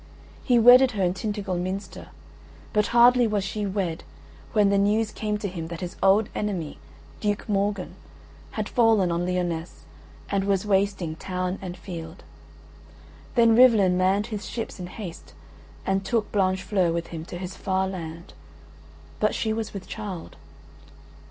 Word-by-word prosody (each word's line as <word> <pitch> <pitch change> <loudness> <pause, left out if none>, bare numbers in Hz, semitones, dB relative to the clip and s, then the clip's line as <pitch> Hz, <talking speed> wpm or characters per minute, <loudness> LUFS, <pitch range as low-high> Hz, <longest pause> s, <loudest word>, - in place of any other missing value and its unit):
He 245 -3 +3
wedded 245 +2 +7
her 200 -3 -1
in 180 0 +2
Tintagel 200 -2 -3
Minster, 190 +2 -5 0.7
but 210 -1 +2
hardly 240 0 +5
was 210 -2 0
she 205 +1 -3
wed 185 -4 -2 0.5
when 210 -2 +4
the 200 - +3
news 210 +2 +2
came 210 -1 -2
to 210 - -3
him 170 -4 -5
that 170 -1 -7
his 180 +1 -5
old 200 +2 +4
enemy 185 -8 -3 0.4
Duke 205 +1 -1
Morgan 200 -2 -1 0.6
had - - -2
fallen 225 -7 +3
on 170 +1 -1
Lyonesse 175 -2 -3 0.4
and 195 -1 0
was 195 0 +1
wasting 195 -5 0
town 185 +1 -3
and 180 -1 -6
field. 170 -1 -8 1.1
Then 230 -2 +5
Rivalen 220 -7 +6
manned 190 +3 +2
his 205 -2 -5
ships 225 -3 -5
in 180 - -5
haste, 180 -2 -9 0.5
and 195 0 0
took 215 +1 -1
Blanchefleur 185 -2 +1
with 170 0 -3
him 160 -1 -5
to 175 - -7
his 185 +1 -6
far 190 0 0
land; 170 -2 -7 0.9
but - - +1
she 220 -1 0
was 220 0 -3
with 195 -2 -7
child. 200 -6 -7
195 Hz, 150 wpm, -25 LUFS, 180-210 Hz, 1.1 s, wedded